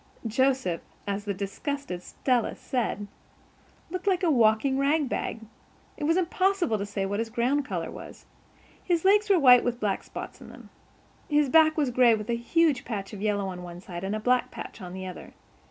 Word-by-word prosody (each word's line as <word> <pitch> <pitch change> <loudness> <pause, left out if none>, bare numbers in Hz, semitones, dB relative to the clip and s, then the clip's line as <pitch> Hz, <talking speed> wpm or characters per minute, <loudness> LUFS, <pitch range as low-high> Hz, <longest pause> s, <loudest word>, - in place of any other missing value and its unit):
Joseph, 255 -6 +1 0.2
as 200 +1 -3
the 205 - -1
disgusted 200 +1 -4
Stella 245 +5 -1
said, 235 -5 -2 0.9
looked 365 +2 -5
like 375 -1 +2
a 335 - +3
walking 240 +2 +3
rag 290 +1 +2
bag. 230 - -3 0.5
It 295 - -4
was 330 +3 +3
impossible 370 - +1
to 200 - -3
say 200 -1 -2
what 200 +2 -2
his 225 0 -2
ground 250 +5 0
color 175 -8 -4
was. - - -11 0.6
His 345 -1 0
legs 415 +2 +4
were 390 - +6
white 250 -5 +7
with 240 -1 -2
black 205 -4 -1
spots - - -9
on - - -11
them. - - -14 0.6
His 295 -2 +3
back 315 +1 +5
was 285 -5 +1
gray 240 -2 +5
with 215 +2 -4
a - - +1
huge 280 +3 +2
patch 205 -4 -5
of 200 - -7
yellow 205 -2 0
on 180 -1 -7
one 175 -1 -9
side 175 -1 -8
and 195 +2 -2
a - - -2
black 250 +3 +2
patch - - -9
on 180 -1 -8
the 185 0 -6
other. 185 -1 -9
240 Hz, 195 wpm, -27 LUFS, 205-295 Hz, 0.9 s, white